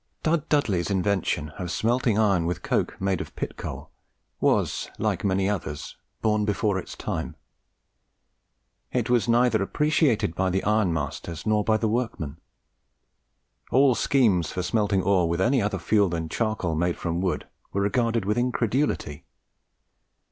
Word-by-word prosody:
Dud 160 -1 0
Dudley's 105 - +1
invention 95 -5 0
of 90 -2 -3
smelting 115 +2 +1
iron 100 -6 +3
with 90 - -3
coke - - -1
made 95 -2 0
of - - -9
pit - - -4
coal - - -7 0.5
was, - - +1
like - - -1
many 95 -1 +1
others, 80 -7 -4 0.3
born 105 -1 +2
before 105 -1 0
its - - -8
time. - - -4 1.6
It - - 0
was 120 -3 +3
neither 120 -2 +3
appreciated 145 - +1
by 95 +1 0
the 95 +1 0
iron 105 -3 +2
masters 80 +1 -4
nor 105 -1 +2
by 110 +1 +2
the 110 - 0
workmen. 105 - -2 1.3
All 135 +1 +5
schemes 105 - +2
for 90 - -3
smelting 100 -2 +1
ore 90 -3 +3
with 85 +1 -1
any 120 +6 +3
other 100 -1 -1
fuel 100 +2 +2
than 80 -1 -3
charcoal 110 -6 -1
made 85 +2 0
from 85 +1 -2
wood 95 -1 -1 0.2
were 100 - -1
regarded 115 0 +1
with 105 +4 +1
incredulity. 120 - -1
100 Hz, 150 wpm, -25 LUFS, 90-115 Hz, 1.6 s, All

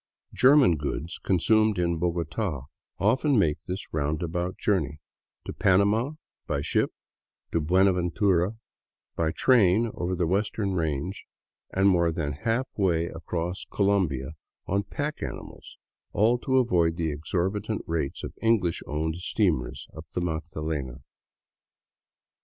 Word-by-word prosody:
German 130 - +5
goods 75 +3 -4
consumed 110 +3 +3
in 85 -2 0
Bogota 85 - -2 0.4
often 130 +6 +2
make 80 -8 +2
this 90 +2 -5
round 75 +2 -1
about 85 +2 -3
journey, 75 -8 0 0.2
— - - -58
to - - -5
Panama, 100 +8 +2 0.3
by 70 - -1
ship - - 0 0.6
to 85 - +1
Buenaventura, 90 +3 +2 0.6
by 80 -1 +1
train 110 +1 +4
over 90 +1 -2
the 90 -1 0
western 100 +2 0
range, 80 +2 -2 0.4
and 95 +1 +2
more 85 -3 +3
than 75 -3 -2
half 115 - -1
way 85 -4 +1
across 85 +2 -4
Colombia 90 -10 +1 0.3
on 100 +1 +1
pack 145 +9 -4
animals, - - -8 0.4
all 115 +4 +3
to 130 +1 +1
avoid 85 -10 +3
the 80 -2 0
exorbitant 95 +8 -2
rates 80 -5 -2
of - - -6
English 110 -7 +2
owned 80 +2 -2
steamers 85 - -1
up 80 +1 -9
the 90 - 0
Magdalena. 80 -5 -4
90 Hz, 125 wpm, -27 LUFS, 80-105 Hz, 0.6 s, German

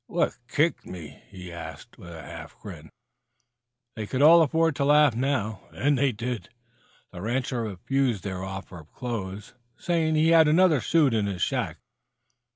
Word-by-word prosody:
"What - - 0
kicked - - +1
me?" 85 -5 -10
he 90 -2 -10
asked, 80 -3 -10
with 85 - -11
a 80 -1 -9
half - - -10
grin. - - -10 1.1
They 110 -2 -5
could 130 +7 0
all 165 +2 +8
afford 165 0 +2
to 140 - +1
laugh 150 -3 +5
now, 110 -6 -1
and 145 +1 +1
they 135 0 +2
did. 115 -3 -5 0.6
The 90 - -9
rancher 125 +3 -2
refused 115 +2 -1
their 95 -2 -4
offer 95 -2 -7
of 80 0 -16
clothes, 105 -5 -5 0.2
saying 165 -2 0
he 155 +1 +3
had 165 -2 +6
another 160 -3 +4
suit 150 +1 +3
in 105 -2 +1
his 95 -3 -2
shack. - - -2
120 Hz, 165 wpm, -26 LUFS, 95-145 Hz, 1.1 s, all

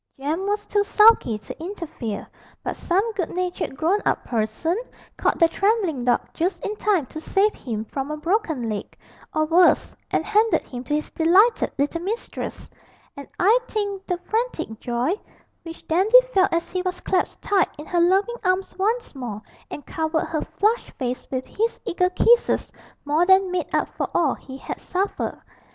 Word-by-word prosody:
Jem 315 +8 -2
was 415 0 -1
too 410 -1 +1
sulky 420 - +5
to 210 +9 -9
interfere, 335 - -5 0.4
but - - -3
some 395 +6 0
good 370 -5 -2
natured 360 -6 -3
grown 355 +6 +2
up - - 0
person 230 +9 -1 0.4
caught - - +1
the 335 - +6
trembling 385 - 0
dog 245 - +3
just 350 +2 -1
in 420 - -2
time 390 -10 +1
to 310 +5 -8
save 405 +5 +2
him 220 -3 -5
from 270 +5 -4
a 305 - -3
broken 320 - 0
leg, 210 -2 -5 0.3
or 310 0 +1
worse, 345 +3 +4
and - - 0
handed 430 +2 +3
him 245 -1 -7
to 295 - 0
his 305 - -3
delighted 380 +8 +4
little 290 +4 0
mistress; 425 +6 -5 0.5
and 280 - -9
I 430 +7 +5
think 405 -2 -3
the 360 - 0
frantic 430 - -2
joy 245 +7 0 0.5
which 330 -1 -11
Dandy 400 +10 +6
felt 380 0 +4
as 335 0 -1
he 365 - -1
was 365 0 -3
clasped 370 - -1
tight 400 -2 +2
in 300 - -8
her 350 - 0
loving 390 +7 +2
arms 370 0 0
once 455 +5 0
more 240 -7 -5 0.3
and 290 - -8
covered 315 0 -1
her 315 - -1
flushed 440 +4 0
face 250 -1 -4
with 260 -1 -3
his 455 +2 -2
eager 365 -3 +1
kisses 470 +6 +3 0.3
more 300 +4 +2
than 380 -1 +5
made 365 -1 -1
up - - +1
for - - -3
all 305 -6 +3
he 265 0 -10
had - - -6
suffered. 385 +2 -2
355 Hz, 175 wpm, -23 LUFS, 295-405 Hz, 0.5 s, the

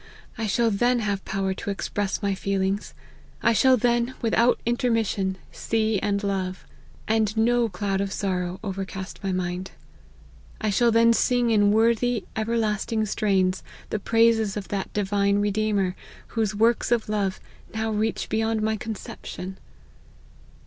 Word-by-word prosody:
I 225 -3 -2
shall 230 +3 +2
then 240 +5 +2
have 200 -2 -1
power 190 0 -1
to 195 - -6
express 200 0 -2
my 200 -1 +1
feelings; 195 +1 -1 0.5
I 235 - +4
shall 260 +3 +5
then, 240 +2 +1
without 235 +1 +3
intermission, 225 -5 0
see 220 -2 0
and 200 +1 -1
love; 190 -2 -2 0.4
and 220 0 +1
no 235 +1 +3
cloud 195 0 -1
of 200 -1 -2
sorrow 185 -2 -2
overcast 195 -1 -5
my 195 - -1
mind. 185 0 -2 0.9
I 215 -2 0
shall 235 +4 +3
then 230 +1 +5
sing 245 0 +2
in 205 -2 +4
worthy, 230 +1 +2
everlasting 220 -1 0
strains, 195 -3 +1 0.3
the 215 - -1
praises 225 -1 +3
of 200 - -6
that 200 -2 -3
divine 200 0 +1
Redeemer, 205 -2 +1 0.3
whose 215 -3 -1
works 230 +3 +2
of 235 -2 +2
love 205 -3 -1 0.3
now 220 0 -2
reach 215 +1 -1
beyond 225 0 0
my 220 0 +1
conception." 200 -4 -7
210 Hz, 140 wpm, -25 LUFS, 195-225 Hz, 0.9 s, shall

